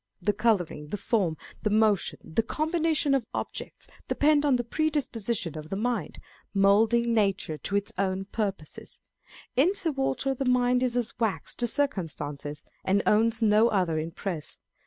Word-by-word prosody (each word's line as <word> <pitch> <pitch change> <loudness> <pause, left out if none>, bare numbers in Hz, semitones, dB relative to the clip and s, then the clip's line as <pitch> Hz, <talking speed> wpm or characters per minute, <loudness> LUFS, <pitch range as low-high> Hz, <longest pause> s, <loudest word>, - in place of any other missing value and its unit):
The 205 +3 +1
colouring, 195 -9 0
the 205 - -4
form, 195 -5 0 0.2
the 215 - 0
motion, 210 -2 +2
the 160 +7 0
combination 315 +3 +1
of 260 -5 0
objects - - -5 0.2
depend 295 0 +3
on 275 - +4
the 245 - 0
pre 310 +7 0
disposition 230 - -2
of 155 0 -7
the 195 - -2
mind, 220 -5 -2 0.4
moulding 225 +4 +4
nature 195 -8 0
to 200 - -3
its 200 0 0
own 190 0 0
purposes; 195 -7 -5 0.6
in 335 +10 +3
Sir 340 -5 0
Walter 270 0 -1
the 270 - -3
mind 250 0 +3
is 250 -2 0
as 240 -2 0
wax 220 -4 0
to 240 - -1
circum 265 - 0
stances, 145 -1 -7 0.2
and 195 +2 +2
owns 225 +2 +3
no 215 +1 +5
other 180 -7 +1
impress. 165 0 -5
220 Hz, 160 wpm, -27 LUFS, 195-250 Hz, 0.6 s, no